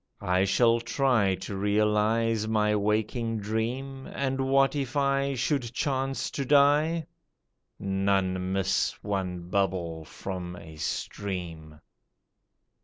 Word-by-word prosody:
I 90 Hz, +1 st, +2 dB
shall 115 Hz, +4 st, +4 dB
try 120 Hz, -5 st, +2 dB
To 100 Hz, -, -6 dB
realize 105 Hz, +2 st, +1 dB
my 105 Hz, -1 st, +2 dB
waking 110 Hz, +2 st, 0 dB
dream, 120 Hz, +6 st, -3 dB
And 135 Hz, -1 st, -1 dB
what 135 Hz, +1 st, +4 dB
if 140 Hz, 0 st, -2 dB
I 140 Hz, 0 st, +1 dB
should 125 Hz, -1 st, -1 dB
chance 135 Hz, -2 st, -1 dB
to 140 Hz, -, -2 dB
die? 150 Hz, +4 st, +4 dB, 0.7 s
None 95 Hz, -1 st, 0 dB
miss 95 Hz, 0 st, +1 dB
one 90 Hz, -3 st, -3 dB
bubble 90 Hz, -5 st, -1 dB
from 90 Hz, 0 st, -6 dB
a 80 Hz, -2 st, -11 dB
stream." 80 Hz, -2 st, -5 dB
105 Hz, 110 wpm, -28 LUFS, 95-135 Hz, 0.7 s, shall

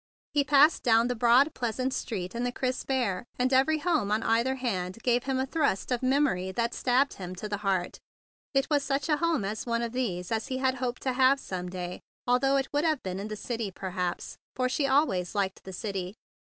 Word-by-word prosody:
He 290 Hz, -1 st, +3 dB
passed 290 Hz, +2 st, +5 dB
down 230 Hz, 0 st, +4 dB
the 245 Hz, -, 0 dB
broad, 245 Hz, +6 st, +4 dB
pleasant 255 Hz, +2 st, -2 dB
street 185 Hz, -9 st, -4 dB
in 235 Hz, -, -2 dB
the 245 Hz, -, 0 dB
crisp 255 Hz, +1 st, -3 dB
air, 235 Hz, -9 st, 0 dB
and 255 Hz, +1 st, +1 dB
every 275 Hz, +4 st, +4 dB
home 310 Hz, -, 0 dB
on 215 Hz, +2 st, +1 dB
either 235 Hz, +4 st, +2 dB
hand 190 Hz, -8 st, -3 dB
gave 245 Hz, 0 st, +2 dB
him 265 Hz, -1 st, 0 dB
a 260 Hz, -, +1 dB
thrust 270 Hz, -, 0 dB
of 245 Hz, -, 0 dB
memory 255 Hz, -9 st, +1 dB
that 235 Hz, +2 st, -1 dB
stabbed 260 Hz, +3 st, +2 dB
him 185 Hz, -1 st, -7 dB
to 210 Hz, -, -5 dB
the 205 Hz, -1 st, -2 dB
heart. 195 Hz, -3 st, -1 dB, 0.6 s
It 270 Hz, -, +3 dB
was 290 Hz, -3 st, +2 dB
such 275 Hz, +2 st, -1 dB
a 300 Hz, -, +3 dB
home 330 Hz, -10 st, +1 dB
as 210 Hz, +4 st, -4 dB
one 235 Hz, 0 st, 0 dB
of 235 Hz, -, -3 dB
these 190 Hz, -8 st, -2 dB
that 225 Hz, -1 st, -1 dB
he 260 Hz, -, -2 dB
had 260 Hz, 0 st, +1 dB
hoped 250 Hz, -1 st, -3 dB
to 260 Hz, -, 0 dB
have 265 Hz, +2 st, +4 dB
some 180 Hz, -6 st, -5 dB
day, 180 Hz, 0 st, -5 dB, 0.3 s
al¬ 250 Hz, 0 st, +3 dB
though 275 Hz, 0 st, +3 dB
it 270 Hz, 0 st, 0 dB
would 290 Hz, +1 st, +2 dB
have 315 Hz, -4 st, +1 dB
been 185 Hz, 0 st, -4 dB
in 200 Hz, -, -4 dB
the 215 Hz, -, -5 dB
city, 225 Hz, -1 st, -3 dB
perhaps, 180 Hz, -1 st, -4 dB, 0.2 s
for 255 Hz, 0 st, +1 dB
she 275 Hz, +2 st, 0 dB
always 240 Hz, -, +1 dB
liked 195 Hz, -2 st, -1 dB
the 190 Hz, -, -7 dB
city. 190 Hz, 0 st, -4 dB
245 Hz, 225 wpm, -28 LUFS, 195-270 Hz, 0.6 s, passed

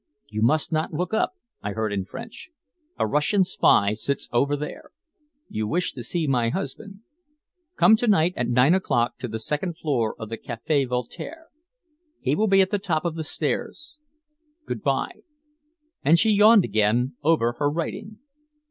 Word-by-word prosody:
"You 110 Hz, 0 st, -4 dB
must 155 Hz, +10 st, +2 dB
not 155 Hz, 0 st, -1 dB
look 180 Hz, +6 st, -3 dB
up," 220 Hz, -, +1 dB, 0.3 s
I 100 Hz, 0 st, -4 dB
heard 110 Hz, -1 st, -2 dB
in 95 Hz, -2 st, -2 dB
French. 230 Hz, -, -9 dB, 0.5 s
"A -, -, +1 dB
Russian 150 Hz, +7 st, +2 dB
spy 100 Hz, -, +3 dB
sits 140 Hz, +6 st, -3 dB
over 140 Hz, +4 st, +2 dB
there. 150 Hz, -, -7 dB, 0.6 s
You 110 Hz, 0 st, -3 dB
wish 175 Hz, +8 st, -1 dB
to 125 Hz, -, -7 dB
see 160 Hz, +7 st, -2 dB
my 125 Hz, -5 st, +1 dB
husband. 195 Hz, -, -6 dB, 0.8 s
Come 220 Hz, -, +7 dB
to 240 Hz, -, -1 dB
night 180 Hz, -4 st, +3 dB
at 120 Hz, -, -1 dB
nine 125 Hz, +6 st, +4 dB
o'clock 120 Hz, -10 st, 0 dB
to 125 Hz, -, -4 dB
the 110 Hz, -1 st, -4 dB
second 150 Hz, +9 st, -2 dB
floor 130 Hz, -10 st, -1 dB
of 110 Hz, -, -7 dB
the 115 Hz, -, -6 dB
Café 135 Hz, +4 st, -1 dB
Voltaire. 275 Hz, -, -5 dB, 0.7 s
He 135 Hz, +2 st, 0 dB
will 220 Hz, +5 st, +1 dB
be 195 Hz, -1 st, +5 dB
at 190 Hz, -, +1 dB
the 205 Hz, -, +1 dB
top 170 Hz, -4 st, -1 dB
of 170 Hz, -, 0 dB
the 160 Hz, 0 st, -4 dB
stairs. 160 Hz, -, -3 dB, 0.7 s
Good -, -, -4 dB
by." -, -, -1 dB, 0.8 s
And 160 Hz, +4 st, +5 dB
she 220 Hz, +5 st, +3 dB
yawned 210 Hz, -1 st, +6 dB
again 110 Hz, +5 st, +1 dB
over 150 Hz, -6 st, +2 dB
her 145 Hz, -1 st, +2 dB
writing. 170 Hz, +7 st, -5 dB
150 Hz, 170 wpm, -24 LUFS, 120-190 Hz, 0.8 s, Come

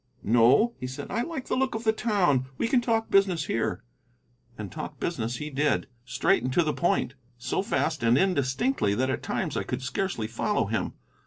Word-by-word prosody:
"No," 120 Hz, -, +4 dB
he 130 Hz, -, -4 dB
said; 130 Hz, -, -7 dB
"I 230 Hz, -, 0 dB
like 270 Hz, -1 st, -4 dB
the -, -, 0 dB
look 260 Hz, -2 st, 0 dB
of 220 Hz, -, -4 dB
the 220 Hz, -1 st, +3 dB
town. 180 Hz, -, +1 dB
We -, -, 0 dB
can 245 Hz, +1 st, +3 dB
talk 225 Hz, -2 st, 0 dB
business 190 Hz, -6 st, +3 dB
here." 110 Hz, -3 st, -2 dB, 0.7 s
And 105 Hz, -3 st, -6 dB
talk -, -, -7 dB
business 115 Hz, +2 st, -2 dB
he 150 Hz, +4 st, -5 dB
did, 145 Hz, +2 st, +1 dB, 0.2 s
straight -, -, +2 dB
and 130 Hz, +2 st, -2 dB
to 170 Hz, -, +4 dB
the 155 Hz, -, 0 dB
point, 175 Hz, -7 st, 0 dB, 0.2 s
so 120 Hz, -, -1 dB
fast 165 Hz, -7 st, -1 dB
and 115 Hz, +2 st, +4 dB
indistinctly 175 Hz, -, +1 dB
that 130 Hz, +3 st, +1 dB
at -, -, -2 dB
times -, -, -2 dB
I -, -, 0 dB
could 125 Hz, +1 st, -4 dB
scarcely 130 Hz, -, -2 dB
follow 115 Hz, +2 st, 0 dB
him. -, -, -2 dB
150 Hz, 195 wpm, -27 LUFS, -, 0.7 s, No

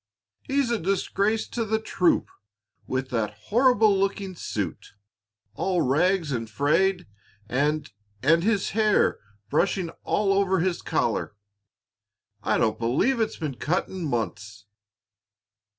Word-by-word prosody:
"He's 275 Hz, -3 st, 0 dB
a 235 Hz, -, +1 dB
disgrace 200 Hz, +4 st, 0 dB
to 235 Hz, -, -2 dB
the 220 Hz, 0 st, 0 dB
troop 180 Hz, -5 st, +1 dB, 0.6 s
with 130 Hz, 0 st, -2 dB
that 115 Hz, -4 st, -2 dB
horrible 220 Hz, -4 st, +3 dB
looking 195 Hz, -1 st, -1 dB
suit, 100 Hz, -, -5 dB, 0.6 s
all 180 Hz, -3 st, 0 dB
rags 160 Hz, +4 st, +2 dB
and 115 Hz, -3 st, -3 dB
frayed, 180 Hz, -, +1 dB, 0.4 s
and 145 Hz, +6 st, 0 dB, 0.4 s
and 165 Hz, +4 st, +4 dB
his 205 Hz, -2 st, +1 dB
hair 215 Hz, -1 st, +2 dB, 0.3 s
brushing 175 Hz, +2 st, +1 dB
all 200 Hz, -1 st, +1 dB
over 195 Hz, -1 st, +2 dB
his 180 Hz, +1 st, 0 dB
collar; -, -, -1 dB, 1.1 s
I -, -, +1 dB
don't 110 Hz, -1 st, +1 dB
believe 140 Hz, -, +1 dB
it's 220 Hz, -, -1 dB
been 145 Hz, -6 st, -4 dB
cut 170 Hz, -, -1 dB
in 190 Hz, -2 st, -6 dB
months." 105 Hz, -6 st, -4 dB
180 Hz, 120 wpm, -25 LUFS, 130-200 Hz, 1.1 s, and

